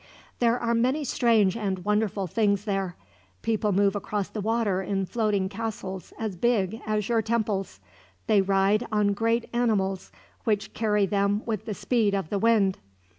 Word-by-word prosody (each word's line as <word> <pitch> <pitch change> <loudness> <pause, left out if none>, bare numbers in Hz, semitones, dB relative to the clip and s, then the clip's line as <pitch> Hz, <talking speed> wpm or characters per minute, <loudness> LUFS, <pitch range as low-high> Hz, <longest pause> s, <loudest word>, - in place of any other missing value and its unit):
There 235 0 +3
are 235 -1 0
many 255 +6 +1
strange 225 -7 +3
and 195 -5 -3
wonderful 210 -2 0
things 200 +2 +1
there. 195 -4 -2 0.5
People 215 -2 +1
move 200 +1 +2
across 205 -1 -2
the 215 - -5
water 215 -3 0
in 195 0 -1
floating 210 -3 0
castles 195 -3 -5
as 220 -4 -3
big 220 0 0
as 215 -1 0
your 230 -2 +2
temples. 210 - -2 0.5
They 205 -2 +4
ride 195 +3 +2
on 210 -1 +2
great 230 +3 0
animals, 200 -6 0 0.3
which 205 -2 -1
carry 210 -2 +2
them 200 +2 0
with 220 -2 -3
the 215 -3 -4
speed 215 -2 +1
of 195 -5 -3
the 200 - 0
wind. 210 -4 +3
210 Hz, 160 wpm, -26 LUFS, 195-225 Hz, 0.5 s, They